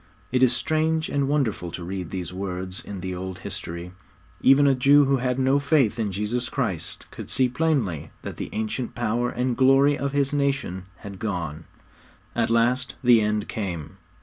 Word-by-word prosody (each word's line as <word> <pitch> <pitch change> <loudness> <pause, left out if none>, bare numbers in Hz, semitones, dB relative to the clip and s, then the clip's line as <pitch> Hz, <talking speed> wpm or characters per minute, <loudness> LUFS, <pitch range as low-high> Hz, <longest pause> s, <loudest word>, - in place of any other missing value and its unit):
' - - -33
It 130 0 +2
is 130 -2 +6
strange 160 +3 0
and 140 -1 0
wonderful 130 -12 0
to 90 - -5
read 90 -1 -5
these 90 -2 -5
words 95 0 -4
in 100 -3 -7
the 95 +1 -4
old 95 0 -5
history. 85 +1 -6 0.5
Even 135 +2 +6
a 140 - +5
Jew 140 +3 +5
who 135 0 +2
had 125 0 -1
no 135 +1 +3
faith 140 -6 +2
in 105 -3 0
Jesus 110 +5 -2
Christ 110 - -3
could - - -8
see 130 - +3
plainly 125 - 0
that - - -6
the - - -5
ancient 110 +3 -3
power 120 +1 0
and 125 0 -1
glory 135 +3 +5
of 140 0 -2
his 140 0 +1
nation 140 -10 -1
had 100 -2 -10
gone. 85 -7 -3 0.7
At - - +1
last 120 +3 +1
the 120 -2 +6
end 105 0 0
came. 90 -8 -5
120 Hz, 180 wpm, -25 LUFS, 95-135 Hz, 0.7 s, is